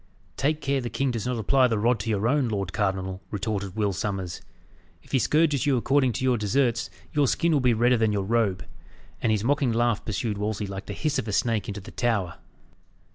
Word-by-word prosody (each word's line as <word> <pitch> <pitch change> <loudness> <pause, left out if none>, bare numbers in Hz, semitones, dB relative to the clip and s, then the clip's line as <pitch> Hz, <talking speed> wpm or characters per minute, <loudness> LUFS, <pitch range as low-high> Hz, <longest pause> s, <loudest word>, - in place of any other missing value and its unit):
"Take 150 +3 0
care 135 -1 0
the 120 - -4
king 135 +4 0
does 115 -2 -3
not 125 -1 -1
apply 130 +4 +3
the 115 -3 0
rod 115 +2 +2
to 110 +3 -4
your 105 0 +1
own, 140 0 +2
lord 100 -3 -3
cardinal," 95 -2 -1
retorted 100 -2 -3
Will 105 -2 0
Sommers. 95 -3 -3 0.6
"If - - -19
he 135 - +3
scourges 150 +1 +2
you 135 -3 +3
according 130 0 +2
to 120 - -3
your 125 -3 +2
deserts, 120 +2 +1 0.2
your 145 -2 +3
skin 170 +6 +1
will 150 - +3
be 125 -3 +3
redder 120 +2 +3
than 110 -1 +2
your 100 -2 0
robe." 100 -3 0 0.6
And 115 - +2
his 105 -1 +1
mocking 140 0 +2
laugh 115 -1 +1
pursued 105 -1 -2
Wolsey 105 0 -2
like 100 0 -7
the 100 - -4
hiss 150 +4 -1
of 115 - -4
a - - -2
snake 110 +1 0
into 100 -1 -5
the - - -11
tower. 105 -8 -1
115 Hz, 220 wpm, -26 LUFS, 100-130 Hz, 0.6 s, apply